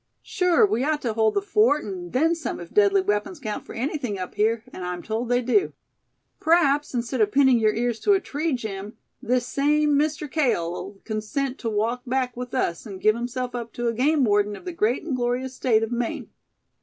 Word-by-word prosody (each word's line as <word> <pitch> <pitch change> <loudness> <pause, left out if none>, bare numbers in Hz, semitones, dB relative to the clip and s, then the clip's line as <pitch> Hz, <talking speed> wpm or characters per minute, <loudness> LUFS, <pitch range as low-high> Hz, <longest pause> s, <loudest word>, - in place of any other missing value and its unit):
"Sure 360 +3 +3
we 260 - 0
ought 300 +1 0
to 235 -3 -1
hold 220 0 +2
the 405 - +1
fort, 405 -7 +3
and 180 -3 -6
then 320 +6 +3
some, 330 -1 -4
if 170 -1 -10
deadly 200 -1 +4
weapons 210 - -1
count 215 -6 -4
for - - -9
anything 250 -4 -2
up 185 -1 -6
here, 220 +1 +1
and 185 - -7
I'm 180 -1 -4
told 225 +2 -3
they 245 0 +2
do. 375 - +2 0.7
P'raps, 295 -4 +2
instead 235 +1 -1
of 210 -1 +3
pinning 265 -2 +5
your 215 -1 +2
ears 235 0 -1
to 410 - +3
a 390 - +3
tree, 310 -2 -2
Jim, 210 -3 -5 0.2
this 250 0 0
same 295 +2 +2
Mister 300 +1 0
Cale'll 195 - -1
consent 245 +5 -3
to 230 - -2
walk 225 +4 -1
back 255 -1 -1
with 250 +1 -6
us, 170 -6 -1
and 195 -3 -8
give 215 +3 +4
himself 245 +1 -4
up 235 -1 -5
to 240 0 -1
a - - -1
game 280 +5 +2
warden 205 -2 +2
of 350 - -13
the 360 - -3
great 240 -5 0
and 310 -5 -2
glorious 250 +1 -1
State 225 -4 +2
of 225 - -3
Maine. 240 -1 -3
245 Hz, 210 wpm, -24 LUFS, 215-285 Hz, 0.7 s, pinning